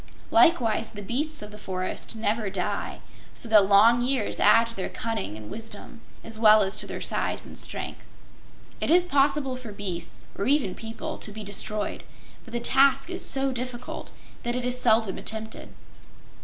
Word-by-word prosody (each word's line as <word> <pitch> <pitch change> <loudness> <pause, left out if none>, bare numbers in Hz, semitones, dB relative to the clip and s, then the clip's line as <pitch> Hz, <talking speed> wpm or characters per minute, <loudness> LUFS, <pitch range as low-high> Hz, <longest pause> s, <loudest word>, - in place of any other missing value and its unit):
Likewise 230 -10 +4
the 205 -1 -9
beasts 290 +6 -3
of 210 - -9
the 210 - -11
forests 185 +3 -4
never 220 -1 -1
die, 190 -2 -3 0.3
so - - -5
that 210 -3 +6
long 225 +4 +6
years 260 +2 -1
add 230 0 +6
to 230 0 -7
their 190 - -3
cunning 225 - -4
and 105 -1 -10
wisdom, 225 0 -9 0.2
as 225 -1 -8
well 215 -1 +7
as 195 +1 -1
to - - -3
their - - -6
size - - -2
and - - -11
strength. - - -3 0.8
It - - -1
is 350 +2 +6
possible 275 -4 +2
for 255 -4 -8
beasts 180 -4 -6
or 200 - -2
even 270 -9 +2
people 225 0 -6
to 215 - -8
be 215 +1 -7
destroyed, 205 +1 -4 0.4
but 235 - -14
the 240 - -2
task 275 +5 +4
is 365 +1 -1
so 270 0 +1
difficult 250 -1 -5 0.3
that 240 0 -2
it 250 -1 -2
is 250 0 +1
seldom 220 -4 +3
attempted. 220 0 -4
225 Hz, 175 wpm, -26 LUFS, 205-255 Hz, 0.8 s, well